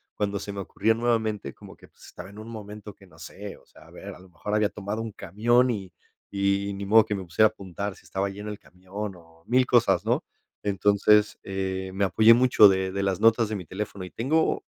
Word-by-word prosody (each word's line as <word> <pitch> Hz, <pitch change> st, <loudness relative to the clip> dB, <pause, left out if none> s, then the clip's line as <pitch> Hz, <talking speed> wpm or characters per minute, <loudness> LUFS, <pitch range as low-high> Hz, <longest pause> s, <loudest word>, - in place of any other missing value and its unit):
cuando 100 Hz, -1 st, -2 dB
se 100 Hz, -, -6 dB
me 100 Hz, -, -6 dB
ocurría 110 Hz, +3 st, 0 dB
nuevamente 110 Hz, -2 st, -1 dB
como -, -, -14 dB
que, -, -, -18 dB
pues, -, -, -20 dB
estaba 90 Hz, +2 st, -11 dB
en 100 Hz, +2 st, -12 dB
un 110 Hz, +1 st, -9 dB
momento 105 Hz, -2 st, -9 dB
que 95 Hz, -, -20 dB
no 80 Hz, -3 st, -20 dB
sé. 100 Hz, +4 st, -9 dB
O -, -, -23 dB
sea, -, -, -19 dB
a -, -, -18 dB
ver, -, -, -10 dB
a -, -, -14 dB
lo 95 Hz, +1 st, -17 dB
mejor 105 Hz, +4 st, -6 dB
había 105 Hz, -1 st, +2 dB
tomado 105 Hz, +2 st, -5 dB
un 115 Hz, -1 st, -5 dB
camión 120 Hz, +6 st, +1 dB
y 95 Hz, -5 st, -5 dB, 0.4 s
y 100 Hz, 0 st, 0 dB
ni 100 Hz, +1 st, -6 dB
modo 110 Hz, +2 st, +6 dB
que -, -, -3 dB
me 95 Hz, -2 st, -4 dB
pusiera 100 Hz, +6 st, +4 dB
a -, -, -3 dB
apuntar 100 Hz, -1 st, -6 dB
si -, -, -20 dB
estaba 95 Hz, +1 st, -2 dB
lleno 105 Hz, +2 st, -7 dB
el 105 Hz, -, -7 dB
camión 95 Hz, +3 st, -7 dB
o 80 Hz, -1 st, -21 dB
mil 125 Hz, +1 st, +3 dB
cosas, 100 Hz, -9 st, +3 dB
¿no? -, -, +1 dB, 0.4 s
Entonces, 105 Hz, +1 st, +3 dB
eh, 95 Hz, -1 st, -4 dB
me 100 Hz, +1 st, +1 dB
apoyé 110 Hz, +6 st, +6 dB
mucho 120 Hz, -4 st, +6 dB
de 95 Hz, 0 st, 0 dB
de 100 Hz, -, -2 dB
las 95 Hz, -1 st, -1 dB
notas 115 Hz, 0 st, +4 dB
de 110 Hz, -, -3 dB
mi 90 Hz, -, -8 dB
teléfono. 100 Hz, +1 st, -6 dB
Y -, -, -11 dB
tengo 155 Hz, +8 st, 0 dB
100 Hz, 235 wpm, -26 LUFS, 95-110 Hz, 0.4 s, modo